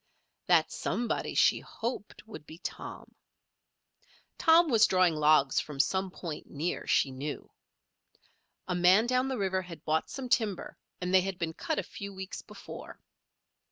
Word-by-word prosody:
That -, -, +4 dB
somebody 240 Hz, 0 st, -2 dB
she -, -, +4 dB
hoped 230 Hz, -3 st, -6 dB
would 155 Hz, -9 st, -10 dB
be 160 Hz, -, -11 dB
Tom. -, -, -8 dB, 1.3 s
Tom 330 Hz, +1 st, +6 dB
was 225 Hz, -6 st, +5 dB
drawing 185 Hz, -2 st, +3 dB
logs 150 Hz, -2 st, +4 dB
from 145 Hz, -2 st, -6 dB
some 190 Hz, +6 st, +1 dB
point 170 Hz, -4 st, -7 dB
near, 160 Hz, +5 st, -3 dB
she 135 Hz, -, +3 dB
knew. 140 Hz, +3 st, -6 dB, 1.2 s
A 185 Hz, -, -1 dB
man 180 Hz, +5 st, +5 dB
down 255 Hz, +1 st, +1 dB
the 265 Hz, -1 st, -2 dB
river 190 Hz, -2 st, 0 dB
had 170 Hz, -4 st, -11 dB
bought 160 Hz, 0 st, 0 dB
some 265 Hz, -2 st, -5 dB
timber 220 Hz, -6 st, 0 dB, 0.2 s
and 180 Hz, +1 st, -3 dB
they 190 Hz, -, +7 dB
had 190 Hz, -1 st, -4 dB
been 165 Hz, -2 st, -3 dB
cut 315 Hz, -, -3 dB
a -, -, 0 dB
few 200 Hz, -2 st, -8 dB
weeks 190 Hz, 0 st, -6 dB
before. -, -, -11 dB
185 Hz, 155 wpm, -30 LUFS, 160-220 Hz, 1.3 s, they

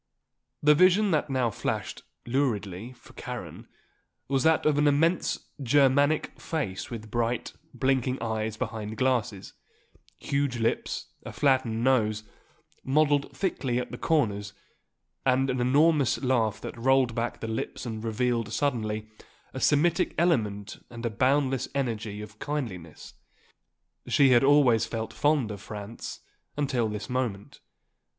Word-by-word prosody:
The 150 Hz, 0 st, +7 dB
vision 185 Hz, +5 st, +4 dB
that 150 Hz, -2 st, +1 dB
now 130 Hz, -4 st, +1 dB
flashed, -, -, -3 dB, 0.2 s
luridly, 115 Hz, -5 st, -1 dB
for 125 Hz, -, -18 dB
Karen, -, -, -7 dB, 0.6 s
was 135 Hz, -1 st, +1 dB
that 160 Hz, +3 st, +3 dB
of 150 Hz, -1 st, +3 dB
an 150 Hz, -, +4 dB
immense 160 Hz, +5 st, +1 dB, 0.2 s
Germanic 140 Hz, +3 st, +2 dB
face 135 Hz, -, -3 dB
with 110 Hz, -3 st, -8 dB
bright, 120 Hz, 0 st, -1 dB, 0.2 s
blinking 130 Hz, -1 st, 0 dB
eyes 110 Hz, -1 st, -2 dB
behind 110 Hz, -1 st, -4 dB
glasses; 120 Hz, -6 st, -1 dB, 0.6 s
huge 140 Hz, -3 st, -1 dB
lips; 115 Hz, 0 st, -2 dB
a -, -, -7 dB
flattened 130 Hz, -5 st, +1 dB
nose, 110 Hz, -5 st, +2 dB, 0.6 s
modelled 145 Hz, +1 st, +1 dB
thickly 135 Hz, -10 st, -1 dB
at 125 Hz, -, -3 dB
the -, -, -6 dB
corners, 105 Hz, -10 st, 0 dB, 0.7 s
and 130 Hz, 0 st, +2 dB
an 130 Hz, -1 st, -1 dB
enormous 145 Hz, +1 st, +3 dB
laugh 115 Hz, -5 st, +1 dB
that -, -, -6 dB
rolled 130 Hz, -1 st, +3 dB
back 115 Hz, +1 st, -3 dB
the 115 Hz, -, -5 dB
lips 110 Hz, +3 st, -4 dB
and 110 Hz, -2 st, -5 dB
revealed 115 Hz, 0 st, -1 dB
suddenly 110 Hz, -6 st, -1 dB, 0.5 s
the 130 Hz, -, -5 dB
Semitic 165 Hz, +6 st, +2 dB
element 105 Hz, -, 0 dB
and 120 Hz, 0 st, -7 dB
a 115 Hz, -, -1 dB
boundless 130 Hz, +2 st, +1 dB
energy 110 Hz, -6 st, -2 dB
and 105 Hz, 0 st, -13 dB
kindliness. 100 Hz, -, -5 dB, 0.9 s
She 140 Hz, -2 st, +4 dB
had 120 Hz, -1 st, +5 dB
always 135 Hz, -5 st, +4 dB
felt 110 Hz, -1 st, -4 dB
fond 145 Hz, -7 st, +1 dB
of 100 Hz, -2 st, -7 dB
Franz 105 Hz, +1 st, -8 dB, 0.4 s
until 130 Hz, -6 st, 0 dB
this 105 Hz, 0 st, -5 dB
moment. 125 Hz, -6 st, -3 dB
125 Hz, 130 wpm, -27 LUFS, 110-140 Hz, 0.9 s, The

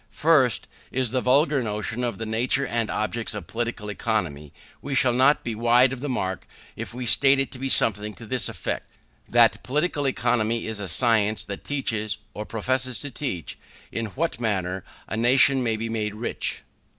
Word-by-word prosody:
First, 135 Hz, -2 st, +2 dB, 0.2 s
as 130 Hz, -2 st, +2 dB
to -, -, -2 dB
the 130 Hz, -, +1 dB
vulgar 140 Hz, +2 st, +3 dB
notion 110 Hz, +2 st, -3 dB
of 120 Hz, -5 st, -2 dB
the 115 Hz, -, -4 dB
nature 120 Hz, +5 st, +1 dB
and 115 Hz, -3 st, -1 dB
object 110 Hz, +1 st, -2 dB
of 105 Hz, -, -6 dB
Political 115 Hz, -2 st, -4 dB
Economy, 85 Hz, -10 st, -2 dB, 0.3 s
we 140 Hz, -1 st, -3 dB
shall 125 Hz, -1 st, +4 dB
not 130 Hz, +4 st, +4 dB
be 115 Hz, -, -3 dB
wide 120 Hz, +3 st, +4 dB
of 135 Hz, -, -6 dB
the 145 Hz, -, -3 dB
mark 95 Hz, -7 st, -3 dB, 0.3 s
if -, -, -6 dB
we 125 Hz, +1 st, -5 dB
state 135 Hz, +3 st, +5 dB
it 135 Hz, 0 st, -1 dB
to 130 Hz, -, -10 dB
be 135 Hz, +1 st, -2 dB
something 105 Hz, -3 st, +2 dB
to 115 Hz, -, -11 dB
this 125 Hz, +3 st, 0 dB
effect: -, -, -4 dB, 0.4 s
That 120 Hz, -1 st, +4 dB
Political 145 Hz, +1 st, 0 dB
Economy 115 Hz, -3 st, 0 dB
is 110 Hz, -1 st, -4 dB
a 100 Hz, -, -4 dB
science 110 Hz, +3 st, +2 dB
which 100 Hz, -, -6 dB
teaches, 110 Hz, -7 st, -2 dB, 0.2 s
or 105 Hz, -, -6 dB
professes 130 Hz, +3 st, -1 dB
to 145 Hz, -, -5 dB
teach, 105 Hz, -, -5 dB, 0.3 s
in 115 Hz, -1 st, -3 dB
what 135 Hz, -, -3 dB
manner 95 Hz, -4 st, -1 dB, 0.2 s
a -, -, -3 dB
nation 130 Hz, +3 st, +5 dB
may 115 Hz, -3 st, 0 dB
be 115 Hz, +1 st, -3 dB
made 105 Hz, -2 st, -3 dB
rich. 115 Hz, +3 st, -2 dB
115 Hz, 185 wpm, -24 LUFS, 110-130 Hz, 0.4 s, state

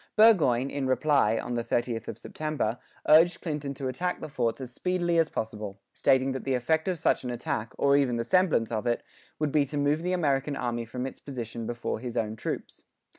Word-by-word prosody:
Burgoyne, 155 Hz, -, +5 dB
in 140 Hz, -2 st, -2 dB
reply, 130 Hz, -4 st, +3 dB
on 120 Hz, -, -3 dB
the 120 Hz, -1 st, -1 dB
30th 115 Hz, -1 st, -1 dB
of 110 Hz, -, -5 dB
September, 145 Hz, -4 st, -3 dB, 0.3 s
urged 165 Hz, +3 st, +6 dB
Clinton 150 Hz, -4 st, -4 dB
to 135 Hz, 0 st, -4 dB
attack 180 Hz, +8 st, -2 dB
the -, -, -6 dB
forts 125 Hz, -5 st, -1 dB
as 130 Hz, -2 st, -7 dB
speedily 175 Hz, 0 st, +1 dB
as 165 Hz, -, +3 dB
possible, 105 Hz, -3 st, -5 dB
stating 130 Hz, 0 st, +3 dB
that 130 Hz, -, -4 dB
the 135 Hz, -1 st, 0 dB
effect 160 Hz, +7 st, +1 dB
of 185 Hz, -2 st, 0 dB
such -, -, +1 dB
an 125 Hz, -, -3 dB
attack, 115 Hz, -1 st, -3 dB
or 140 Hz, 0 st, +4 dB
even 130 Hz, -4 st, +2 dB
the 115 Hz, -, 0 dB
semblance 175 Hz, -9 st, +2 dB
of 110 Hz, 0 st, -2 dB
it, 120 Hz, -, 0 dB, 0.3 s
would 150 Hz, -2 st, 0 dB
be 150 Hz, 0 st, +4 dB
to 140 Hz, +2 st, -5 dB
move 145 Hz, +2 st, +2 dB
the 180 Hz, +2 st, -1 dB
American 145 Hz, -4 st, +1 dB
army 120 Hz, -2 st, -2 dB
from 125 Hz, +3 st, -4 dB
its 135 Hz, -, -7 dB
position 115 Hz, -4 st, -6 dB
before 120 Hz, -2 st, -3 dB
his 120 Hz, 0 st, -5 dB
own 110 Hz, -1 st, -1 dB
troops. 110 Hz, -, -5 dB
130 Hz, 210 wpm, -28 LUFS, 120-155 Hz, 0.3 s, urged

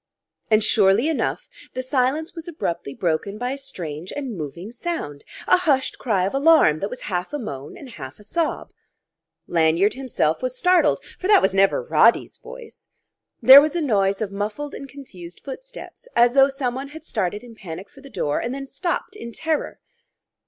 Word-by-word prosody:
And, 215 Hz, -1 st, +4 dB
surely 205 Hz, +4 st, +3 dB
enough, 320 Hz, -, -2 dB, 0.3 s
the 255 Hz, -, -2 dB
silence 270 Hz, +5 st, 0 dB
was 330 Hz, -1 st, -8 dB
abruptly 170 Hz, -, -4 dB
broken 180 Hz, +4 st, -1 dB
by 245 Hz, +3 st, -2 dB
a 275 Hz, -, -4 dB
strange 170 Hz, -, -7 dB
and 270 Hz, -6 st, -5 dB
moving 170 Hz, +5 st, -7 dB
sound, 240 Hz, -, -5 dB, 0.2 s
a -, -, +6 dB
hushed 290 Hz, -7 st, 0 dB
cry 200 Hz, -7 st, +1 dB
of 195 Hz, -, -2 dB
alarm 275 Hz, -, +5 dB
that 200 Hz, -, -3 dB
was 250 Hz, -, -8 dB
half 180 Hz, +6 st, -3 dB
a -, -, -1 dB
moan 145 Hz, -, -7 dB
and 280 Hz, -, -10 dB
half 135 Hz, -, -9 dB
a -, -, -14 dB
sob. 325 Hz, +9 st, -2 dB, 0.7 s
Lanyard 170 Hz, +4 st, +2 dB
himself 245 Hz, -, -1 dB
was 255 Hz, 0 st, -3 dB
startled: 360 Hz, +3 st, +3 dB, 0.2 s
for 370 Hz, -, -2 dB
that 415 Hz, -, +7 dB
was 190 Hz, -, +2 dB
never 195 Hz, -, +3 dB
Roddy's 480 Hz, -, +3 dB
voice! -, -, -12 dB, 0.5 s
There 265 Hz, +4 st, +11 dB
was 305 Hz, +3 st, -1 dB
a -, -, +1 dB
noise 200 Hz, -7 st, +1 dB
of 200 Hz, -, -5 dB
muffled 210 Hz, +9 st, -4 dB
and 275 Hz, -, -8 dB
confused 185 Hz, -12 st, -11 dB
footsteps, -, -, -10 dB
as 240 Hz, 0 st, +5 dB
though 270 Hz, 0 st, +6 dB
someone 270 Hz, 0 st, -3 dB
had 310 Hz, +3 st, -11 dB
started 205 Hz, -, -2 dB
in 240 Hz, -2 st, -12 dB
panic 190 Hz, -3 st, -8 dB
for 275 Hz, -, -18 dB
the 275 Hz, -, -13 dB
door, 145 Hz, -, -2 dB
then 275 Hz, +2 st, -5 dB
stopped 350 Hz, +7 st, -3 dB
in 235 Hz, -, -8 dB
terror. 315 Hz, +5 st, -2 dB
245 Hz, 180 wpm, -22 LUFS, 190-290 Hz, 0.7 s, There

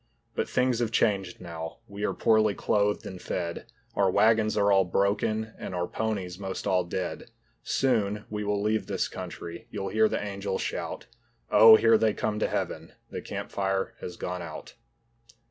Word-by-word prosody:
But -, -, -2 dB
things 125 Hz, -2 st, +2 dB
have 120 Hz, -2 st, +1 dB
changed 95 Hz, -5 st, +1 dB
now, 80 Hz, -2 st, -7 dB
we 100 Hz, 0 st, -7 dB
are -, -, 0 dB
poorly 110 Hz, -2 st, +3 dB
clothed 105 Hz, 0 st, +1 dB
and 95 Hz, -2 st, -7 dB
fed. 85 Hz, -2 st, -4 dB, 0.3 s
Our 100 Hz, -1 st, +3 dB
wagons 110 Hz, +2 st, +3 dB
are 100 Hz, 0 st, +4 dB
all 95 Hz, -1 st, +5 dB
broken 105 Hz, +4 st, 0 dB
and 90 Hz, -, -5 dB
our 90 Hz, 0 st, 0 dB
ponies 100 Hz, -4 st, -3 dB
most 95 Hz, -1 st, -5 dB
all 95 Hz, -3 st, +2 dB
dead. 90 Hz, +1 st, -4 dB, 0.4 s
Soon 105 Hz, -5 st, 0 dB
we 105 Hz, 0 st, -4 dB
will 105 Hz, 0 st, 0 dB
leave 105 Hz, -2 st, 0 dB
this -, -, -1 dB
country, 85 Hz, +7 st, -8 dB
you'll 100 Hz, -3 st, -4 dB
hear 110 Hz, +2 st, +3 dB
the -, -, -1 dB
angels 100 Hz, -1 st, -3 dB
shout, -, -, -4 dB, 0.5 s
"Oh, 110 Hz, 0 st, +10 dB
here 115 Hz, 0 st, +5 dB
they 110 Hz, -2 st, +2 dB
come 105 Hz, -1 st, -1 dB
to -, -, +1 dB
Heaven, -, -, -3 dB, 0.2 s
the -, -, -4 dB
campfire 95 Hz, -1 st, -2 dB
has 90 Hz, -, -7 dB
gone 90 Hz, 0 st, -4 dB
out." 85 Hz, -2 st, -8 dB
100 Hz, 170 wpm, -28 LUFS, 95-110 Hz, 0.5 s, Oh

